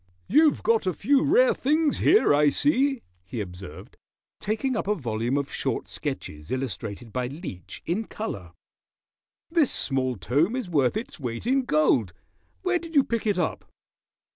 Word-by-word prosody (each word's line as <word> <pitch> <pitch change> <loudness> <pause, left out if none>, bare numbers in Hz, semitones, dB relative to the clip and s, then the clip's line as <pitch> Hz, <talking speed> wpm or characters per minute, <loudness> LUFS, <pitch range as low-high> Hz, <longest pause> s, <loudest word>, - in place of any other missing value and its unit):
"You've 305 +2 +4
got 225 -4 +2
a 185 - 0
few 275 +6 +3
rare 475 - +4
things 300 +2 +1
here, 405 - +5
I 145 0 +5
see," 275 - +1 0.2
he 95 +6 -6
observed, 90 -2 -8 0.4
taking 230 +5 -1
up 220 - -2
a 210 - +2
volume 120 - -1
of 140 -1 -3
short - - -2
sketches 75 +1 -6
illustrated 115 -3 -4
by 125 -1 -1
Leech, 130 - -8
in 200 +7 -1
color. 100 - -6 1.0
"This 330 -6 +3
small 130 -2 0
tome 145 - +1
is 255 -6 -3
worth 140 - +2
its 220 -6 -7
weight 120 - -5
in 265 +1 +2
gold. 150 - +2 0.5
Where 365 -2 +1
did 335 -1 -10
you 280 - +6
pick 230 -3 -2
it 205 -3 +1
up?" 175 - -2
175 Hz, 160 wpm, -26 LUFS, -, 1.0 s, you